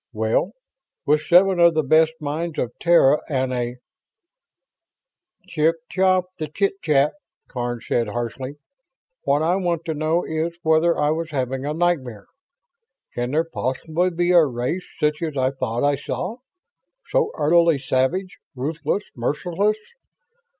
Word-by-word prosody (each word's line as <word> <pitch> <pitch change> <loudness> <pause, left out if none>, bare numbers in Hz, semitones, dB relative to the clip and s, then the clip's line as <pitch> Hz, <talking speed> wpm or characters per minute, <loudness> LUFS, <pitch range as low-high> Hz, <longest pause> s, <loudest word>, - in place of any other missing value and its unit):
"Well, 110 - 0 0.5
with 150 +1 +3
seven 180 +3 +4
of 170 -1 +5
the 155 - +2
best 160 +3 +4
minds 155 +2 -3
of 120 - -1
Terra 160 -4 +4
and 130 -3 0
a 120 -1 -2 0.8
..." 360 - -44
"Chip 165 -2 +2 0.2
chop 185 -1 +3
the 155 - -3
chit 195 +5 -1
chat!" 145 -1 +2 0.3
Karns 120 -3 -4
said, 115 -2 0
harshly. 120 +5 -4 0.7
"What 145 +2 +2
I 175 +3 +2
want 170 -3 -1
to 160 - -2
know 155 +3 0
is 160 +2 -3
whether 160 +2 +3
I 150 - +2
was 160 +1 -2
having 135 -1 -2
a 150 - -2
nightmare. 140 -12 -1 0.9
Can 120 0 -2
there 155 +4 +1
possibly 165 +3 -2
be 175 0 0
a 175 -2 +7
race 130 +6 -2
such 150 +1 0
as 155 -4 -3
I 130 0 +2
thought 125 -3 -3
I 145 0 +2
saw? 180 - -4 0.7
So - - +2
utterly 170 0 +4
savage 135 +8 -1 0.2
ruthless 155 +8 -2
merciless! 175 - 0
155 Hz, 145 wpm, -22 LUFS, 130-175 Hz, 0.9 s, a